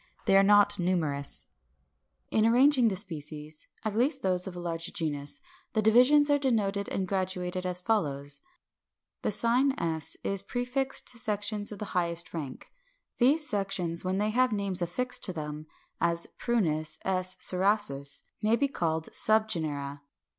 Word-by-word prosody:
They 195 - +4
are 195 - +8
not 205 0 +5
numerous. 160 -6 -1 0.9
577. - - +2
In 225 +1 +4
arranging 260 0 +5
the 205 - 0
species, 155 -5 -6 0.2
at 215 -1 -2
least 265 +4 +1
those 180 0 0
of 185 - -7
a - - -6
large 170 0 -4
genus, 145 - -1 0.3
the 220 - +2
divisions 255 +7 +5
are 285 - +3
denoted 205 -7 0
and 190 -1 -2
graduated 185 -1 -2
as 180 0 -1
follows: 145 -9 -1 0.8
The - - -1
sign 245 +6 +4
§ 160 - -1
is 195 -1 0
prefixed 250 +5 -2
to 240 - -6
sections 210 -2 0
of 210 - -7
the 210 - -5
highest 170 -1 0
rank: 145 -6 -7 0.5
these 295 +5 +3
sections 190 - -1
when 185 +1 -1
they 210 +1 0
have 255 +2 +2
names 200 -3 -1
affixed 250 +9 -2
to 185 - -3
them 150 -1 -6 0.3
(as 170 0 +1
Prunus 165 -10 0
§ 185 -1 -1
Cerasus) 185 -8 +1 0.2
may 215 +2 +3
be 280 +4 +1
called 160 - -2
subgenera. 155 -10 0
190 Hz, 155 wpm, -29 LUFS, 165-220 Hz, 0.9 s, are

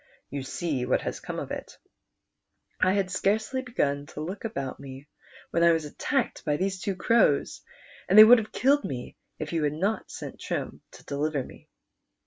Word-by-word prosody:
You 140 0 -3
see 135 0 -2
what 125 - +1
has - - -4
come - - -6
of - - -5
it. - - -7 1.0
I 185 - +3
had 195 -2 0
scarcely 220 +7 0
begun 145 - -1
to 150 - -8
look 185 +6 -5
about 140 - -4
me 135 +1 -10 0.4
when 170 - +1
I 170 0 +6
was 160 -2 -1
attacked 250 - -2
b\' 150 -2 +1
these 190 +1 -2
two 195 0 -2
crows, 195 -7 +2 0.5
and 195 - +4
they 215 - +14
would 235 +2 +8
ha\ 215 - -5
e - - -31
killed 285 +3 +3
me 125 -3 -6 0.2
if 155 +1 -5
you 165 - +1
had 145 0 +1
not 195 +8 -1
sent - - -8
Trim - - -4
to - - -14
deliver 145 0 -1
me." - - -14
170 Hz, 190 wpm, -27 LUFS, 145-215 Hz, 1.0 s, they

